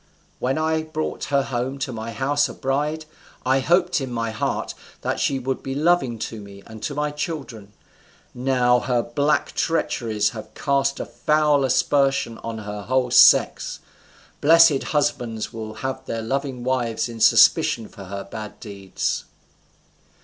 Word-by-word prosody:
When 130 +3 0
I 160 0 +1
brought 155 0 -4
her 140 -1 +1
home 130 0 -3
to 135 -1 -3
my 115 0 -5
house 145 +4 +1
a - - -9
bride, 150 +3 -2 0.4
I 130 +1 +3
hoped 175 +3 +2
in 130 -2 -4
my 115 -1 -2
heart 110 - -2 0.3
that - - -2
she 135 - +1
would 130 0 -3
be 135 0 -5
loving 150 -6 +2
to 110 -2 -8
me 100 -1 -12
and 110 -1 -11
to 145 - -4
my 150 0 -1
children. 140 - -6 0.6
Now, 125 -1 +2
her 120 +2 0
black 145 +5 0
treacheries 110 -10 0
have 110 -2 -10
cast 140 -1 0
a - - -3
foul 150 +4 +2
aspersion 135 -2 +1
on 115 -1 -6
her 105 -1 -6
whole 125 +3 0
sex. - - +5 0.6
Blessed 165 -2 +6
husbands 120 -7 -1
will 110 -1 -7
have 130 - -3
their 115 -1 -3
loving 135 +1 -3
wives 125 -3 -1
in 115 -1 -9
suspicion 110 0 +5
for 100 -3 -12
her 100 +1 -6
bad 105 +1 -8
deeds." 100 -3 -4
130 Hz, 155 wpm, -23 LUFS, 115-145 Hz, 0.6 s, Blessed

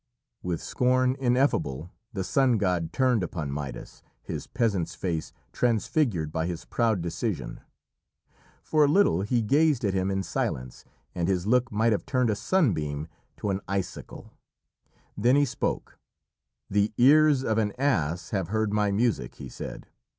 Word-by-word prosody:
With 90 -2 -3
scorn 130 0 +2
ineffable 120 - +1 0.2
the 100 -5 -3
sun 130 +3 +2
god 90 -5 0
turned 125 -5 +2
upon 80 -5 -4
Midas, 70 -1 -6 0.2
his - - -6
peasant's 105 -9 -1
face 85 -4 -3 0.2
transfigured 115 - +1
by 80 +1 -1
his 85 -2 -5
proud 110 -7 0
decision. 85 - -3 1.0
For 155 -1 +3
a - - +3
little 145 - +3
he 115 +3 0
gazed 145 +1 +3
at 100 - +1
him 95 0 0
in 95 0 -1
silence, 65 -8 -3 0.3
and 85 -1 -1
his 95 -2 0
look 125 +2 +2
might 110 +2 +2
have 105 - -1
turned 125 -4 +2
a - - 0
sunbeam 80 - 0 0.3
to 105 - -2
an 95 0 -2
icicle. 95 -1 -5 0.8
Then 120 +5 +3
he 145 0 +4
spoke: 130 - -3 0.7
"The 105 +1 +1
ears 145 +1 +5
of 110 -3 +1
an 105 -2 +1
ass 90 - 0
have 95 -5 -1
heard 110 +1 0
my 105 -1 +2
music," 100 - 0
he - - -9
said. - - -8
105 Hz, 150 wpm, -27 LUFS, 85-125 Hz, 1.0 s, ears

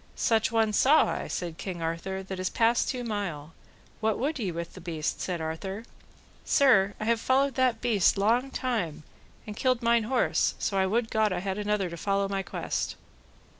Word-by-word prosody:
Such 225 -1 +1
one 225 -2 +2
saw 280 +8 +5
I, - - -4
said 170 -2 -4
King 185 -3 -5
Arthur, 170 +4 -3
that 190 0 -6
is 185 - -1
past 230 0 +2
two 250 -2 -3
mile; 175 -9 -4 0.5
what 220 -1 0
would 290 +3 -2
ye 200 -6 -1
with 170 0 -6
the 185 - -11
beast? 160 -3 -3
said 180 -2 -2
Arthur. 190 +6 -4 0.6
Sir, 205 -9 +4
I 215 - -3
have 230 0 +1
followed 270 +1 +2
that 250 -3 +1
beast 215 -8 +3
long 235 +7 +2
time, 220 - -2 0.4
and 210 -2 -7
killed 255 0 +1
mine 235 -1 +3
horse, 255 +3 +1
so 190 -2 0
would 225 +2 0
God 220 -1 +2
I 185 - -1
had 190 +1 -3
another 210 -2 0
to 170 0 -7
follow 195 +3 0
my 195 0 -2
quest. - - -3
210 Hz, 185 wpm, -28 LUFS, 185-235 Hz, 0.6 s, saw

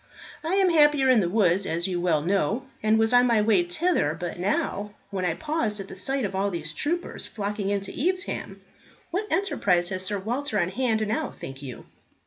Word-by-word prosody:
"I 330 +4 0
am 385 -2 +4
happier 295 -4 +5
in 255 -3 +6
the 175 -4 +1
woods, 190 -2 +2
as 170 +2 -1
you 180 -2 -2
well 160 -4 +2
know, 200 +7 0 0.2
and 215 +1 +3
was 225 +1 +2
on 245 0 +6
my 230 -2 +3
way 210 -3 +4
thither 175 - 0
but 175 0 -5
now, 205 +2 -1 0.2
when 190 -2 -2
I 165 -2 0
paused 295 - -2
at 195 - -7
the - - -8
sight 265 +6 0
of 195 - -4
all 195 +1 0
these 160 -4 -5
troopers 340 - -1
flocking 205 -1 -3
in 200 -1 0
to 195 - -6 0.2
Evesham. 375 +1 -4 0.5
What 395 +5 -2
enterprise 180 - +1
has 185 -1 -3
Sir 205 +2 -2
Walter 235 +4 -2
on 175 -1 +1
hand 220 0 0
now, 295 +7 -1
think 135 +1 -9
you?" 130 -4 -8
205 Hz, 205 wpm, -26 LUFS, 180-265 Hz, 0.5 s, in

